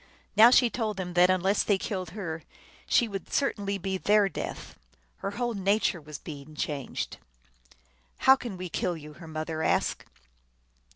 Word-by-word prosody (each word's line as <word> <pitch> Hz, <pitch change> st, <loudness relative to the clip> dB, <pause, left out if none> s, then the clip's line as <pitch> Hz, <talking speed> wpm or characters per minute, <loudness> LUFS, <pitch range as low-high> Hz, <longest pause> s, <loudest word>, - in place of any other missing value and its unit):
Now 225 Hz, +2 st, +9 dB
she 245 Hz, -1 st, +5 dB
told 215 Hz, -4 st, -2 dB
them 180 Hz, -2 st, -4 dB
that 180 Hz, +1 st, +5 dB
un 185 Hz, -1 st, +3 dB
less 195 Hz, +3 st, +2 dB
they 205 Hz, -, +2 dB
killed 185 Hz, -3 st, -4 dB
her 165 Hz, -5 st, -4 dB, 0.5 s
she 235 Hz, -, +4 dB
would 195 Hz, -4 st, -6 dB
certainly 200 Hz, -8 st, 0 dB
be 190 Hz, 0 st, -3 dB
their 205 Hz, 0 st, +4 dB
death. -, -, -6 dB, 0.4 s
Her -, -, -3 dB
whole 240 Hz, -1 st, 0 dB
nature 200 Hz, -3 st, +1 dB
was 150 Hz, 0 st, -8 dB
being 150 Hz, -1 st, -10 dB
changed. 145 Hz, -3 st, -3 dB, 0.5 s
" -, -, -31 dB
How 265 Hz, -, +9 dB
can 235 Hz, -7 st, -7 dB
we 180 Hz, 0 st, -5 dB
kill 175 Hz, +1 st, -2 dB
you? 150 Hz, -1 st, -10 dB
" -, -, -18 dB
her 165 Hz, -, -9 dB
mother 155 Hz, 0 st, -4 dB
asked. -, -, +1 dB
185 Hz, 175 wpm, -28 LUFS, 160-210 Hz, 0.5 s, Now